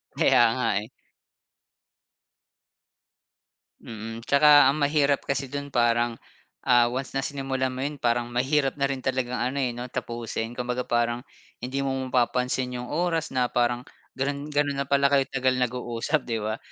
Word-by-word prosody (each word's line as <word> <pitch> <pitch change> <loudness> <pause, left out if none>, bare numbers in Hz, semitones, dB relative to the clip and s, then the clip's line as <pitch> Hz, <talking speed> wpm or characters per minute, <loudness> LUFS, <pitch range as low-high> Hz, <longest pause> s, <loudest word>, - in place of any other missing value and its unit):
Kaya - - +4
nga 130 - 0 0.2
eh. - - -10 2.9
Mm, 115 +1 -8
tsaka 145 0 +7
ang 140 +3 +2
mahirap 145 -1 +2
kasi 140 0 -2
dun 140 0 -4
parang 120 -1 +1 0.5
ah, 120 -1 +5
once 130 +2 -4
na 135 - +1
sinimulan 135 -2 -2
mo 130 - -7
'yon, 150 +1 -3
parang 120 0 +1
mahirap 135 +2 +1
na 140 -1 0
rin 135 - -3
talagang 130 -1 -1
ano, 125 +3 -1
eh, 125 - +1
'no, 120 +1 -6
tapusin. 115 -2 -4
Kumbaga, 125 0 -2
parang 120 0 0 0.4
hindi 130 +2 -3
mo 135 - 0 0.2
pa 125 -2 +4
pa 125 - 0
pansin 125 0 -2
'yong 125 0 -6
oras 165 0 0
na 125 -1 +1
parang, 120 0 +1 0.3
gano'n, 140 +2 -2
gano'n 145 -1 +1
na 140 - -5
pala 140 0 +4
kayo 135 -1 +5
tagal 130 -1 +1
nag-uusap, 125 +3 -2
'di 115 -2 -2
ba? 110 +1 -2
130 Hz, 160 wpm, -26 LUFS, 120-140 Hz, 2.9 s, tsaka